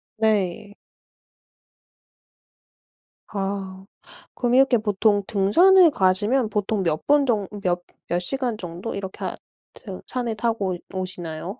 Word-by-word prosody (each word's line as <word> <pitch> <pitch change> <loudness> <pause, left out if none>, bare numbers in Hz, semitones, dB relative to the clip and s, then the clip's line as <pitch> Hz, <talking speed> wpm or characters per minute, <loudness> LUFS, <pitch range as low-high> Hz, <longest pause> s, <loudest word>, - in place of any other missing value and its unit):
네. 210 -1 0 2.5
아. 195 -2 -4 0.5
그럼 245 0 +1
이렇게 270 -2 +5
보통 205 -1 +1
등산을 340 - +5
가시면 210 +3 +2
보통 205 -1 -1
몇 155 -2 -1
분 290 -1 +4
정 215 -6 0
몇 175 -1 0 0.3
몇 175 - 0
시간 245 +4 -1
정도 180 +4 -6
이렇게 190 -1 -6
하 - - -3 0.4
트 190 -5 -9
산을 240 -3 -3
타고 215 -5 -1 0.2
오 190 - -3
오시나요? 175 0 -6
205 Hz, 205 characters per minute, -23 LUFS, 190-235 Hz, 2.5 s, 이렇게